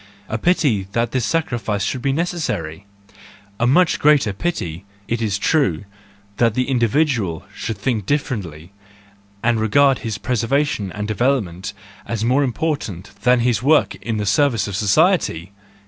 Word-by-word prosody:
A 110 - -3
pity 130 - +1
that 115 0 0
this 130 -4 0
sacrifice 115 -10 -1
should 125 +5 -2
be 135 - +1
necessary! 105 - -3 0.7
A 120 - +2
much 160 +7 +3
greater 145 -8 +4
pity, 95 - -3 0.2
it 115 0 -2
is 105 -3 0
true, 105 - +1 0.5
if 115 -2 +3
the 125 - 0
individual 120 - 0
should 115 - -4
think 105 -1 -2
differ¬ 140 -6 0
ently, 80 -2 -11 0.7
and 120 -1 +2
regard 135 +5 +3
his 110 -4 -4
preservation 120 -2 -1
and 105 +1 -4
development 105 -5 -1 0.3
as 115 -1 -2
more 130 +4 +3
important 125 - -2
than 125 -1 +4
his 120 -2 +1
work 150 +4 +3
in 115 -2 -2
the 105 - -2
service 115 +2 +2
of 100 - -4
society! 105 - +2
115 Hz, 145 wpm, -20 LUFS, 100-140 Hz, 0.7 s, greater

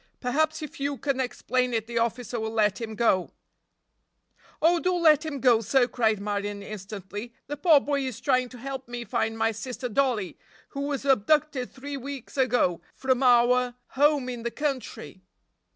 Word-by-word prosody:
"Perhaps 315 +5 0
if 300 - -8
you 280 0 -1
can 275 -1 -1
explain 250 -1 -1
it 220 -1 -1
the 235 0 -2
officer 235 0 -2
will 220 0 -2
let 215 -1 +1
him 220 -1 -5
go." 205 -5 +2 1.3
"Oh, 340 +2 +4
do 365 +1 +1
let 315 -3 +5
him 305 -3 -4
go, 240 -3 +4
sir," 245 +3 +3
cried 220 -3 +1
Marion 205 0 -3
instantly. 205 +2 -7
"The 290 - -4
poor 310 -1 +6
boy 285 0 -1
is 235 -4 -6
trying 255 0 +1
to 250 - -11
help 265 +1 -6
me 240 0 -5
find 225 +2 -1
my 225 0 +2
sister 250 +3 -5
Dollie, 235 - 0 0.3
who 280 - -5
was 280 -1 -3
abducted 275 +1 +2
three 280 +2 -6
weeks 275 -1 -8
ago 245 -10 +2
from 260 -1 0
our 245 0 +4
home 285 -1 +2
in 245 -2 -5
the 235 - -2
country!" 270 -8 -4
250 Hz, 170 wpm, -26 LUFS, 225-275 Hz, 1.3 s, poor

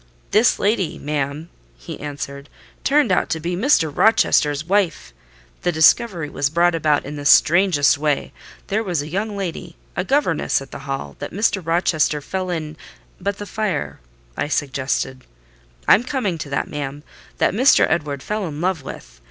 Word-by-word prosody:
"This 220 +3 +4
lady, 200 -4 0
ma'am," 150 +2 -3 0.3
he - - -9
answered, 140 -1 -6 0.3
"turned 285 -6 +3
out 185 - +1
to 160 - -1
be 175 +3 -3
Mr. 175 - +2
Rochester's 150 -9 +3
wife! 185 - 0 0.5
The 175 - +1
discovery 165 +1 +3
was 145 -1 -1
brought 170 +3 +3
about 155 -3 +1
in 145 +2 -6
the 145 - -6
strangest 145 -3 +4
way. 150 -2 -1 0.3
There 210 +2 -1
was 175 -8 -1
a - - -8
young 205 +4 -3
lady, 175 -2 -5 0.2
a 180 - -1
governess 270 - +1
at 135 0 -11
the - - -7
Hall, 135 - -4
that - - -5
Mr. 200 -1 0
Rochester 165 -2 +1
fell 185 +5 -4
in—" 155 -3 -4 0.4
"But 200 0 -2
the 205 - -6
fire," 205 -5 -3 0.4
I - - -2
suggested. 130 -2 -2 0.6
"I'm 225 - +6
coming 245 - -2
to 150 -2 -6
that, 140 - -1
ma'am—that 145 0 -4
Mr. 255 +7 +5
Edward 145 -4 -2
fell 210 -3 -2
in 150 -2 -6
love 180 -2 0
with. - - -10
165 Hz, 160 wpm, -21 LUFS, 145-195 Hz, 0.6 s, I'm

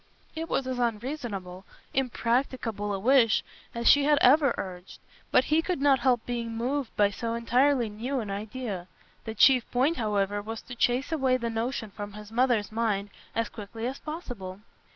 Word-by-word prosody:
It 325 +1 -4
was 270 - 0
as 255 -1 -3
unreasonable, 220 -6 -3 0.3
impracticable 240 -4 -1
a 200 - -1
wish 230 +1 +4 0.3
as 235 0 -1
she 285 -1 +7
had 295 0 +4
ever 280 0 +5
urged, 180 -1 -7 0.3
but - - +4
he 310 +4 +2
could 355 -2 -2
not 275 -1 +4
help 245 -2 +2
being 230 -2 -3
moved 255 +2 -2
by 205 -1 +3
so 230 +2 -3
entirely 245 +2 +2
new 240 +6 -3
an 210 -4 -4
idea. 205 -2 -5 0.4
The 220 -1 -5
chief 255 +2 +5
point, 270 +7 +1
however, 205 -2 0
was 225 +2 -6
to 250 - -9
chase 245 +4 +1
away 265 -5 +2
the 235 -2 -3
notion 225 -1 -3
from 205 0 -7
his 210 0 -10
mother's 240 -3 +2
mind 210 -3 -1 0.2
as 230 -1 0
quickly 225 +1 -7
as 260 +2 -3
possible. 235 - -7
235 Hz, 175 wpm, -28 LUFS, 210-260 Hz, 0.4 s, she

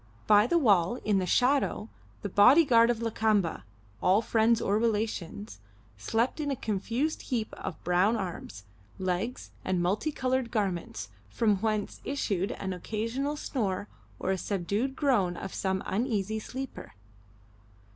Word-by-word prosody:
By 210 +1 +6
the 340 - +3
wall, 200 - +3
in 205 -2 +3
the 185 - -2
shadow, 255 0 +2 0.4
the - - -1
body 250 - +6
guard 230 -3 +5
of 235 -1 0
Lakamba 215 -6 +1 0.4
all 195 +5 +4
friends 225 +1 +3
or 205 +2 +1
relations 205 - -2 0.4
slept 225 - -1
in 295 -2 -1
a 275 - 0
confused 235 +8 -2
heap 230 -5 -3
of 160 - -7
brown 180 +6 +3
arms, 175 - -6 0.3
legs, 185 +6 -3
and 185 -1 0
multi 200 - 0
coloured 260 -3 -1
garments, 175 - -2 0.2
from 210 - +2
whence 215 0 -2
issued 200 -9 -1
an 190 -1 -4
occasional 230 - -3
snore 205 -9 -2 0.3
or - - -1
a 190 - -1
subdued 205 +8 -2
groan 205 - +1
of 190 - -6
some 190 -1 -1
uneasy 220 -1 -1
sleeper. 265 +4 -7
215 Hz, 140 wpm, -29 LUFS, 190-240 Hz, 0.4 s, By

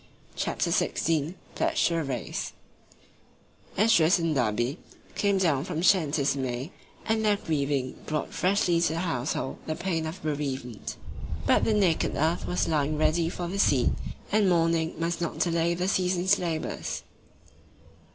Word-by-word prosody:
CHAPTER - - -1
XVI 160 +1 0 0.2
PLEDGED - - +1
TO 170 - -1
THE 165 -1 0
RACE 130 -4 -4 1.2
ESDRAS 195 -5 +5
and 165 -2 0
Da'Be 120 +3 0 0.4
came 200 -1 +1
down 160 -8 +2
from 180 -2 -4
the 165 - -1
shanties 155 -7 +3
in 135 - -2
May, 130 +5 -3 0.3
and 220 0 +1
their 210 -1 +3
grieving 140 -7 -1
brought 150 -1 -2
freshly 180 -3 +2
to 170 - +2
the 165 - -2
household 140 -5 -2
the 155 - -1
pain 165 -3 -2
of 160 +3 -6
bereavement. 135 -7 -3 0.5
But - - +4
the 220 - +2
naked 185 -6 +2
earth 160 +4 0
was 180 - 0
lying 150 -1 +1
ready 165 +2 +2
for 175 0 -4
the 195 +3 -4
seed, 130 - +4 0.4
and 205 -2 +4
mourning 165 -1 +2
must 170 +2 -2
not 165 -2 -2
delay 170 +1 +1
the 180 +2 -1
season's 185 0 +2
labours. 165 -3 -3
165 Hz, 150 wpm, -27 LUFS, 145-180 Hz, 1.2 s, ESDRAS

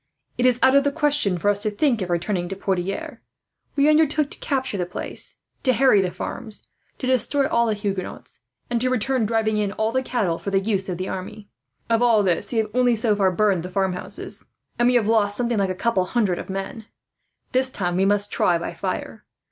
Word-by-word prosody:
It 250 - +2
is 250 -1 +3
out 265 - +6
of 280 - +5
the 285 - +1
question 290 - +2
for 190 - -3
us 205 0 +3
to 215 - +1
think 235 +1 +1
of 180 - -3
returning 175 +1 -1
to 195 - -4
Poitiers. 190 0 -3 0.6
We 285 0 +3
undertook 305 -1 +3
to - - -8
capture 265 -5 -2
the 175 - -1
place, 180 - -5 0.3
to 255 - +2
harry 245 -4 +4
the 185 - -1
farms, 215 +4 -7 0.3
to - - -5
destroy 260 +2 +2
all 235 0 +2
the 220 - 0
Huguenots, 200 -2 -5 0.3
and 240 -1 -1
to 255 - +3
return 255 -1 +1
driving 220 -1 0
in 205 -1 -1
all 220 +1 -1
the 260 +2 +1
cattle 205 -10 -1
for - - -4
the 195 -1 +2
use 195 -1 -1
of 180 - -3
the 185 +1 -4
army. 200 +3 -7 0.4
Of 230 0 +2
all 230 -4 +4
this 180 -3 0
we 235 - -2
have 215 -1 0
only 245 -1 +3
so 220 -1 +2
far 195 -2 +2
burned 195 -1 +1
the 180 - -6
farmhouses, 185 -1 0 0.3
and 240 - +4
we 250 - +2
have 235 -3 +3
lost 205 -2 +2
something 240 -3 0
like 195 -1 +1
a 185 - -2
couple 230 0 +1
of 185 - -4
hundred 205 -8 -1
men. 195 +3 -5 0.6
"This 260 +1 +2
time, 175 -7 -2
we 190 +1 +2
must 205 0 +2
try 175 - +2
by 170 - -5
fire. - - -5
215 Hz, 220 wpm, -23 LUFS, 190-245 Hz, 0.6 s, out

